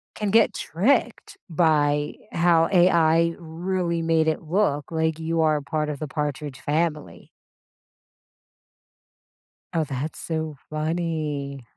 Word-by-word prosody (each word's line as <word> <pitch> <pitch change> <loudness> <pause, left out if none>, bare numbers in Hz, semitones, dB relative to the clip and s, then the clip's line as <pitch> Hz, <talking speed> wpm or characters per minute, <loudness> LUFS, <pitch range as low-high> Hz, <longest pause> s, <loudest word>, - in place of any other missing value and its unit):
can 210 -1 -2
get 225 0 +4
tricked 220 - 0
by 150 -3 +2 0.2
how 170 -1 +3
AI 170 -2 +4
really 170 +1 -2
made 165 -1 +2
it 160 - 0
look 160 -3 0
like 160 -1 0
you 165 0 -1
are 155 -1 +3
part 150 +2 -2
of 145 - -5
the 155 - -4
Partridge 145 -1 -4
family. 150 - -2 2.5
Oh, 165 - +1
that's 140 +1 -5
so 160 -2 -3
funny. 155 -4 -3
160 Hz, 110 wpm, -24 LUFS, 150-170 Hz, 2.5 s, get